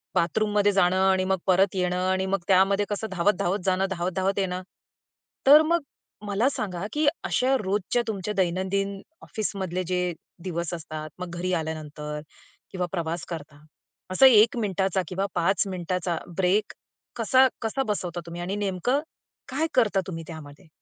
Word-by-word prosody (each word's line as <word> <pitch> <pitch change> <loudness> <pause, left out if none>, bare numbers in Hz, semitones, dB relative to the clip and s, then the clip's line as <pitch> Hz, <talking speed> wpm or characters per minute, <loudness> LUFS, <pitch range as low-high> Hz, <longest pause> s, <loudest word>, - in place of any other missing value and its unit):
बाथरूममध्ये 205 +4 +2
जाणं 185 -2 +3
आणि 190 -1 +3
मग 190 - +3
परत 190 +1 +3
येणं 180 -1 0
आणि 190 0 +1
मग 195 +1 0
त्यामध्ये 195 +2 +4
कसं 210 +1 -2
धावत-धावत 190 +1 +1
जाणं, 190 0 +2
धावत-धावत 185 +2 -1
येणं. 185 -1 -1 0.9
तर 295 +3 +10
मग 335 +2 +2 0.5
मला 205 +6 +2
सांगा, 190 -8 -4
की 300 0 +1 0.2
अशा 260 +2 +2
रोजच्या 200 +4 0
तुमच्या 210 -1 -3
दैनंदिन 190 +2 0 0.2
ऑफिसमधले 190 -5 -3
जे 180 -1 0 0.3
दिवस 170 -2 -3
असतात, 155 -2 -6
मग 180 -1 -5
घरी 180 +1 -2
आल्यानंतर 150 -2 -4 0.5
किंवा 180 -1 -1
प्रवास 170 -2 -3
करता. 150 -3 -8 0.5
असा 185 +8 +6
1 225 -1 +6
मिनिटाचा 190 -3 0
किंवा 190 +3 -2
5 175 +2 +2
मिनिटाचा 180 -1 -2 0.2
ब्रेक 190 +3 +2 0.4
कसा 255 +3 +5
कसा 225 +5 -1
बसवता 180 -4 -2
तुम्ही? 170 +1 -7
आणि 185 +3 -3
नेमकं 205 +6 0 0.5
काय 295 +5 0
करता 215 -6 +3
तुम्ही 165 -3 -5
त्यामध्ये? 150 -2 -10
190 Hz, 145 wpm, -26 LUFS, 175-205 Hz, 0.9 s, तर